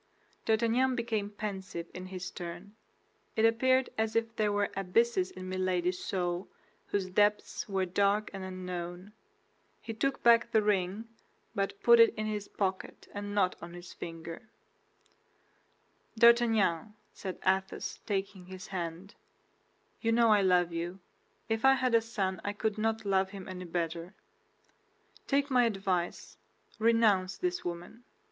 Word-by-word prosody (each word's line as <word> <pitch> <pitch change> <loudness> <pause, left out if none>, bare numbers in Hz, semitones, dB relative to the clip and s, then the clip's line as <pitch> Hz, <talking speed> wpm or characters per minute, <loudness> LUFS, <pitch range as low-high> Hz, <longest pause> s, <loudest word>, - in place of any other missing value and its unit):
D'Artagnan 235 +4 +2
became 225 -4 -1
pensive 195 -5 -5
in 185 0 -7
his 185 -1 -6
turn; 175 +4 -8 0.6
it 220 - +3
appeared 255 +3 +3
as 220 0 0
if 230 0 0
there 210 -2 +1
were 205 0 0
abysses 195 +1 +2
in 185 0 -9
Milady's 185 -1 -1
soul 175 -1 -2 0.4
whose 190 -2 -2
depths 210 +2 +1
were 190 -1 +1
dark 200 +3 +1
and 195 -1 -6
unknown. 180 +1 -6 0.7
He 225 - -6
took 275 +5 -1
back 235 0 +6
the 220 -2 +3
ring, 205 +1 0 0.5
but 195 0 -2
put 235 0 +7
it 230 - +6
in 215 - -3
his 210 -1 -3
pocket 190 -2 -3
and 205 0 -5
not 185 -3 +2
on 170 +1 -8
his 175 0 -10
finger. 165 +5 -8 1.7
"D'Artagnan," 220 -5 +4 0.2
said 190 -2 -6
Athos, 190 0 0
taking 195 -2 -3
his 185 0 -9
hand, 175 +1 -5 0.9
"you 230 - +1
know 230 0 +4
I 205 - +4
love 180 -2 +3
you; 175 +3 -4 0.5
if 225 0 -1
I 270 0 +7
had 255 -2 0
a 230 - +6
son 195 -5 -2
I 205 - -2
could 215 0 -2
not 220 0 0
love 190 -1 +2
him 195 -1 -8 0.3
better. 170 +2 -3 1.1
Take 280 0 +1
my 250 -2 +5
advice, 195 -5 -2 0.4
renounce 215 -5 +3
this 360 -1 -2
woman. 175 +7 -6
200 Hz, 140 wpm, -31 LUFS, 185-225 Hz, 1.7 s, put